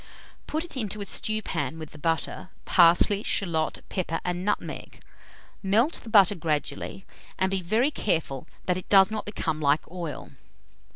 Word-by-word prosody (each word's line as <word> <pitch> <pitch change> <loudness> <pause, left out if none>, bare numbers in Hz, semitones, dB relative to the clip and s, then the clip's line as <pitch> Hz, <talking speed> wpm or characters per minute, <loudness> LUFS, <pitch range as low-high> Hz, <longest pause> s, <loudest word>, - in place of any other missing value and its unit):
Put 315 +1 -2
it 345 - -10
into 215 -4 -3
a 200 - -4
stewpan 175 -10 -2
with 155 -2 -8
the 155 - -13
butter, 165 +3 -2 0.2
parsley, 180 +4 +5
shalot, 165 -7 -1
pepper, 170 -3 -2
and 180 0 -2
nutmeg. 210 +1 -3 0.6
Melt 220 - +2
the 230 - -10
butter 205 -3 +6
gradually, 160 +2 -3 0.3
and 190 0 +1
be 195 -1 0
very 225 - +1
careful 160 - -2 0.2
that 180 -1 +1
it 185 - -8
does 195 0 +6
not 215 -1 -3
become 160 -6 -2
like 145 +1 +3
oil. 175 -4 -6
185 Hz, 155 wpm, -26 LUFS, 160-210 Hz, 0.6 s, butter